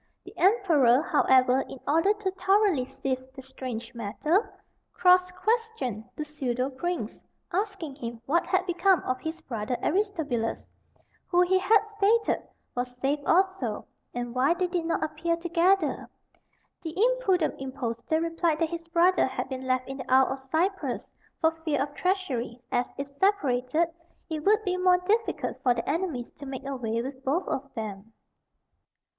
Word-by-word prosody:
The -, -, -12 dB
emperor, 320 Hz, -, +4 dB
however, 260 Hz, -4 st, +4 dB
in 265 Hz, -, -8 dB
order 330 Hz, +7 st, +4 dB
to 415 Hz, -2 st, -1 dB
thoroughly 385 Hz, -6 st, +2 dB
sift 260 Hz, -1 st, -4 dB
the 265 Hz, -, -9 dB
strange 255 Hz, -3 st, -6 dB
matter, 300 Hz, -, 0 dB, 0.4 s
cross 365 Hz, 0 st, +5 dB
questioned 395 Hz, -, -1 dB
the 305 Hz, -, -4 dB
pseudo 265 Hz, -3 st, -2 dB
prince, 270 Hz, -4 st, -4 dB, 0.3 s
asking 380 Hz, -7 st, -2 dB
him 235 Hz, -3 st, -6 dB
what 335 Hz, +6 st, +1 dB
had 370 Hz, -1 st, +1 dB
become 360 Hz, -1 st, +3 dB
of 255 Hz, 0 st, -1 dB
his 320 Hz, +1 st, -5 dB
brother 230 Hz, 0 st, -3 dB
Aristobulus, 320 Hz, -, -1 dB, 0.6 s
who, 355 Hz, 0 st, +3 dB
he 370 Hz, +1 st, +4 dB
had 420 Hz, +3 st, +4 dB
stated, 425 Hz, +2 st, +2 dB, 0.3 s
was 245 Hz, 0 st, -4 dB
saved 280 Hz, +3 st, -1 dB
also, 360 Hz, -, +1 dB, 0.3 s
and 240 Hz, -1 st, -4 dB
why 265 Hz, +7 st, +3 dB
they 365 Hz, -, 0 dB
did 350 Hz, -2 st, -2 dB
not 335 Hz, -, 0 dB
appear 315 Hz, +2 st, -1 dB
together. 345 Hz, 0 st, +1 dB, 0.7 s
The 325 Hz, 0 st, -6 dB
impudent 425 Hz, -8 st, +2 dB
impostor 260 Hz, +3 st, -2 dB
replied 330 Hz, -1 st, 0 dB
that 325 Hz, 0 st, 0 dB
his 335 Hz, -1 st, -5 dB
brother 345 Hz, +1 st, +4 dB
had 260 Hz, 0 st, -4 dB
been 260 Hz, -1 st, -5 dB
left 255 Hz, 0 st, +1 dB
in 270 Hz, 0 st, -6 dB
the 255 Hz, -1 st, -7 dB
Isle 260 Hz, 0 st, +5 dB
of 265 Hz, 0 st, -12 dB
Cyprus, 375 Hz, +5 st, 0 dB, 0.4 s
for 320 Hz, -, +4 dB
fear 300 Hz, -4 st, 0 dB
of 280 Hz, +2 st, -2 dB
treachery, 285 Hz, -, -1 dB
as, 245 Hz, 0 st, +1 dB
if 275 Hz, 0 st, -4 dB
separated, 310 Hz, -5 st, +2 dB, 0.4 s
it 310 Hz, -1 st, -3 dB
would 430 Hz, +3 st, +4 dB
be 365 Hz, -3 st, 0 dB
more 365 Hz, 0 st, +5 dB
difficult 430 Hz, +5 st, -1 dB
for 245 Hz, -2 st, +3 dB
their 230 Hz, -, -4 dB
enemies 310 Hz, -6 st, -2 dB
to 285 Hz, -, -8 dB
make 270 Hz, 0 st, -6 dB
away 245 Hz, -5 st, -2 dB
with 265 Hz, 0 st, -7 dB
both 300 Hz, +8 st, 0 dB
of 275 Hz, +1 st, -3 dB
them. 215 Hz, 0 st, -6 dB
305 Hz, 155 wpm, -27 LUFS, 255-365 Hz, 0.7 s, cross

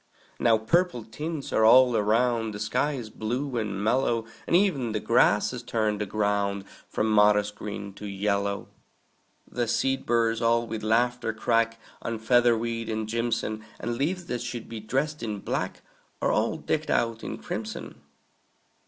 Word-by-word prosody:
Now 115 Hz, -1 st, +4 dB
purple 125 Hz, +3 st, +1 dB
tints 150 Hz, +6 st, -5 dB
are 110 Hz, -, +3 dB
all 125 Hz, +2 st, +7 dB
around; 115 Hz, +1 st, +1 dB
The -, -, -6 dB
sky 125 Hz, +8 st, 0 dB
is 120 Hz, -6 st, -6 dB
blue 125 Hz, +5 st, -3 dB
and 105 Hz, -3 st, -2 dB
mellow; 115 Hz, 0 st, +1 dB, 0.2 s
And -, -, +2 dB
e'en 145 Hz, -, +2 dB
the 105 Hz, -, 0 dB
grasses 115 Hz, +1 st, +3 dB
turn 110 Hz, -4 st, -1 dB
the 105 Hz, -, -2 dB
ground 100 Hz, -1 st, 0 dB, 0.2 s
From -, -, 0 dB
modest 105 Hz, -1 st, +4 dB
green 100 Hz, -1 st, -6 dB
to 105 Hz, -, -5 dB
yellow. 100 Hz, 0 st, -1 dB, 0.8 s
The 120 Hz, -1 st, -2 dB
seed 130 Hz, +4 st, 0 dB
burrs 115 Hz, -1 st, +2 dB
all 115 Hz, 0 st, +3 dB
with 110 Hz, -1 st, -5 dB
laughter 115 Hz, +1 st, +1 dB
crack 115 Hz, 0 st, +1 dB, 0.2 s
On 115 Hz, -1 st, -3 dB
featherweed 115 Hz, 0 st, +2 dB
and 110 Hz, -1 st, -2 dB
jimson; 115 Hz, -1 st, -1 dB, 0.2 s
And 120 Hz, -, -2 dB
leaves 175 Hz, +8 st, -1 dB
that 125 Hz, -7 st, -3 dB
should 120 Hz, -1 st, -5 dB
be 115 Hz, -1 st, -6 dB
dressed 135 Hz, +7 st, -2 dB
in 110 Hz, -3 st, -3 dB
black -, -, -3 dB, 0.4 s
Are -, -, +1 dB
all -, -, +1 dB
decked -, -, -2 dB
out 115 Hz, -1 st, 0 dB
in -, -, -4 dB
crimson. -, -, -6 dB
115 Hz, 155 wpm, -27 LUFS, 110-120 Hz, 0.8 s, all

